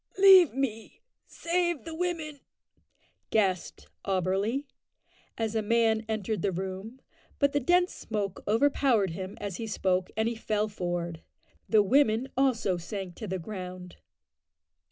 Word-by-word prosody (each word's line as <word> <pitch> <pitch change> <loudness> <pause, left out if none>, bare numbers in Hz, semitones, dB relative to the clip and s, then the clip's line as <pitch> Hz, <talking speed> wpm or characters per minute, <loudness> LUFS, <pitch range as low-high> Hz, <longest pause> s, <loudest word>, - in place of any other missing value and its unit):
"Leave 380 -4 +8
me; 265 - -4 0.2
save 345 -2 -1
the 325 - -6
women," 320 -4 -3 0.9
gasped 190 -5 0 0.2
Auberly, 195 +8 0 0.7
as 225 -1 -1
a 220 - +1
man 225 0 +2
entered 215 -1 -2
the 200 - +1
room, 190 +7 -5 0.4
but 280 -1 +3
the 285 - +1
dense 355 +6 +2
smoke 205 -3 -4
overpowered 230 -3 +2
him 185 +3 -6
as 200 -3 -4
he 225 - -5
spoke, 185 -3 0
and 220 +1 +2
he 235 - 0
fell 215 -1 -1
forward. 175 -4 -4 0.5
The 215 -2 +5
women 245 +2 +3
also 240 -8 +1
sank 185 +1 -6
to 215 - -6
the 190 0 -2
ground. 180 -1 -8
220 Hz, 135 wpm, -28 LUFS, 190-270 Hz, 0.9 s, Leave